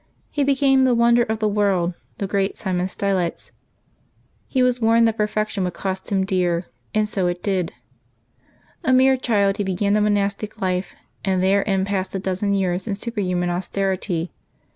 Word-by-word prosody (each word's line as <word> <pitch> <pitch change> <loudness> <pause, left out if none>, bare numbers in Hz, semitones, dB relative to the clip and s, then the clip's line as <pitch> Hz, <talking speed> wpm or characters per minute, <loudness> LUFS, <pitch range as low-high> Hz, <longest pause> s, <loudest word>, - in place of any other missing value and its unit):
He 290 - 0
became 270 -1 +3
the 255 -2 +3
wonder 235 +1 +4
of 220 -1 0
the 215 0 0
world, 200 -4 +1 0.2
the 200 - -2
great 195 0 -1
St. 190 - -4
Simeon 180 +1 0
Stylites. 190 -3 -2 1.0
He 260 -2 +1
was 250 -1 +1
warned 230 +1 +4
that 225 - 0
per 210 -1 +1
fection 215 -2 -2
would 180 -1 -3
cost 190 0 -4
him 190 -1 +2
dear, 180 -3 0 0.3
and 215 0 +1
so 195 -3 -1
it 175 0 -3
did. 185 -4 0 1.1
A 260 - +2
mere 265 +1 +5
child, 205 -6 +1
he 205 - 0
began 195 +1 0
the 210 - +3
monastic 205 0 0
life, 185 0 -2 0.3
and 190 -2 +1
therein 195 0 +2
passed 195 -1 -2
a - - -1
dozen 195 +2 -1
years 185 +1 -1
in 205 - -1
superhuman 185 -5 -2
austerity. 185 -1 -2
200 Hz, 175 wpm, -22 LUFS, 185-215 Hz, 1.1 s, mere